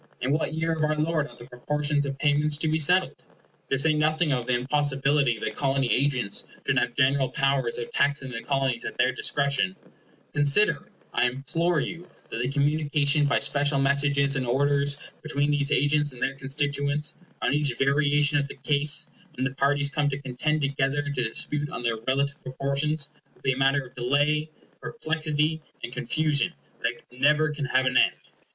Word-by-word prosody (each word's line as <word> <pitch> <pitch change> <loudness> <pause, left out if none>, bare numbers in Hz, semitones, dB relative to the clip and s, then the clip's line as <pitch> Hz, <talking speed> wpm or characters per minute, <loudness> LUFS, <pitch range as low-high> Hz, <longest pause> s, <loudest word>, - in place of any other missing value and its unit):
In 130 - -1
what 155 +1 +1
year 160 +1 0
of 160 -1 -2
our 155 0 +1
Lord 155 -1 0
are - - -15
the 120 - -12
proportions 145 +3 -1
of 135 -1 -4
payments 150 +1 +2
to 160 - 0
be 155 +1 +1
settled? 180 +5 +3 0.5
To 135 - +1
say 155 +4 +3
nothing 155 +1 +1
of 125 -2 -1
the 125 - +2
impossibility 135 -1 +1
that - - -4
Colony 135 -2 +1
agents 125 -7 +1 0.2
should - - +2
have - - -2
general 135 -1 +2
powers 135 -3 0
of 120 - -5
taxing 140 -2 0
the 115 -1 -5
Colonies 135 -3 -1
at - - -6
their 130 - +3
discretion, 135 -7 0 0.6
consider, 145 +3 +2 0.2
I 125 - +3
implore 155 +6 0
you, 175 +1 -6 0.2
that - - -4
the 125 +2 -1
communication 145 0 +1
by 140 - +2
special 145 0 +1
messages 140 0 +2
and 135 - -1
orders 140 +2 +1 0.2
between 145 -2 0
these 145 0 +1
agents 145 0 +2
and 125 - -5
their 135 - 0
constituents, 145 +2 -1 0.3
on - - +2
each 145 -2 +2
variation 145 +1 +3
of 140 - -2
the - - -9
case, 145 +2 +1 0.3
when 130 - -3
the 135 - -2
parties 140 +1 +1
come 150 -1 +1
to 135 - -3
contend 140 +3 -2
together 140 +1 0
and 140 - -3
to 130 - -1
dispute 145 +6 -2
on 180 -7 -6
their 115 -1 0
relative 140 +3 0
proportions, 140 +3 -2 0.3
will - - -27
be 135 - +2
a 130 - -3
matter 135 0 +2
of 125 - -15
delay, 145 +5 +1 0.3
perplexity, 155 -4 -1 0.2
and 120 - -5
confusion 155 +6 0 0.3
that 120 0 -2
never 150 +4 +2
can 145 -1 -3
have 130 0 +1
an 130 0 +2
end. - - +4
140 Hz, 185 wpm, -26 LUFS, 135-150 Hz, 0.6 s, end